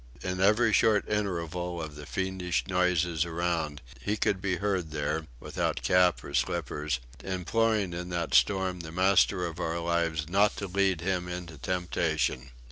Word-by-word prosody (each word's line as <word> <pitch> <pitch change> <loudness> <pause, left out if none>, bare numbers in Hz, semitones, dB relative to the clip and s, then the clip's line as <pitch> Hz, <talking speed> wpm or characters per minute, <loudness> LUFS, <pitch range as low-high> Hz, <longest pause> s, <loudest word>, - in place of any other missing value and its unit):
In 90 -1 -2
every 110 +3 +4
short 110 -2 +4
interval 90 -4 -2
of 80 -2 -5
the 75 0 -9
fiendish 95 -2 -1
noises 90 -3 +2
around 85 -4 -2 0.2
he 105 +1 -1
could 95 -2 +1
be 95 -2 0
heard 95 -3 -1
there, 75 +1 -2
without - - -2
cap 90 -2 +3
or 70 - -8
slippers, 75 -1 -1 0.2
imploring 100 +1 0
in 90 +1 -5
that 85 -2 -2
storm 95 -2 +3
the 80 -1 -7
Master 95 +1 +3
of 85 0 -6
our 85 -1 -1
lives 85 -2 0
not 100 +4 +3
to 100 - -3
lead 95 -2 +1
him 90 -1 -1
into 90 -4 -6
temptation. 80 -6 -1
90 Hz, 155 wpm, -29 LUFS, 80-95 Hz, 0.2 s, every